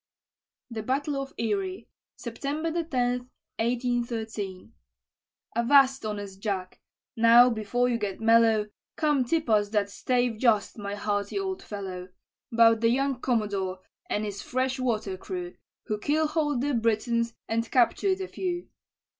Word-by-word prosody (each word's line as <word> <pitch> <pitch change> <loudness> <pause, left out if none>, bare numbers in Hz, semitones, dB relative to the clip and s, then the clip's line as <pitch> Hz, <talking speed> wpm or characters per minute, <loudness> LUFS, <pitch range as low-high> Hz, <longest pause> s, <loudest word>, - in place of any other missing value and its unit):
THE 225 -1 -4
BATTLE 275 +6 -1
OF 275 - -7
ERIE 375 - -2 0.3
[September 285 +7 -3
10, 250 -4 -1 0.3
1813] 230 -4 -2 0.8
Avast, 270 +2 +4
honest 205 -2 -5
Jack! 195 -3 -3 0.4
now, 235 +2 +7
before 230 +3 0
you 240 -2 0
get 200 -3 -3
mellow, 225 -1 +4 0.3
Come 295 -4 +2
tip 315 +6 0
us 210 -2 +3
that 205 -2 0
stave 245 -1 0
just, 225 -3 +2
my 200 0 -4
hearty 205 - -2
old 380 -1 -2
fellow, 190 -3 -6 0.4
'Bout 230 -1 +5
the 230 - +4
young 270 +2 +1
commodore, 200 -6 -1 0.3
and 210 +1 -1
his 200 -1 -5
fresh 260 +1 -1
water 215 -6 -1
crew, 355 - -6 0.3
Who 215 -2 -3
keelhaul'd 300 0 +1
the 285 +1 0
Britons, 230 0 0
and 230 +1 -1
captured 375 +10 +2
a 380 - -3
few. 355 -2 -4
235 Hz, 130 wpm, -27 LUFS, 210-270 Hz, 0.8 s, now